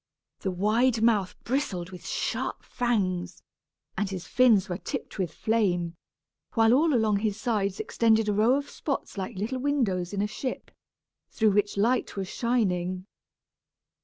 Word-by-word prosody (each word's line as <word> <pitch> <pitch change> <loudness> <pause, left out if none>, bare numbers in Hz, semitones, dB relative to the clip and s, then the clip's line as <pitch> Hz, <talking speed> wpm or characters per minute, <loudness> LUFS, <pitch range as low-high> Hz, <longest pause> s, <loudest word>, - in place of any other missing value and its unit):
The 195 - -2
wide 220 +5 +2
mouth 210 -5 +2
bristled 195 -9 -2
with 180 - -10
sharp - - -2
fangs, 185 -7 -1 0.5
and 205 - -1
his 185 -3 -5
fins 235 -6 +4
were 180 -1 -4
tipped 270 -4 -6
with 180 -5 -1
flame, 180 -5 0 0.6
while 225 0 +5
all 300 +2 +4
along 220 -3 +3
his 210 0 -1
sides 205 -5 -1
extended 225 -1 +2
a 210 - +2
row 220 +5 +4
of 285 0 -2
spots 275 - -4
like 195 +2 -4
little 230 +7 -2
windows 235 -11 0
in 200 0 -1
a - - 0
ship, 255 +4 -5 0.6
through 220 -2 +2
which 205 0 +1
light 235 +5 +1
was 195 -2 -3
shining. 185 -6 0
210 Hz, 150 wpm, -27 LUFS, 190-240 Hz, 0.6 s, while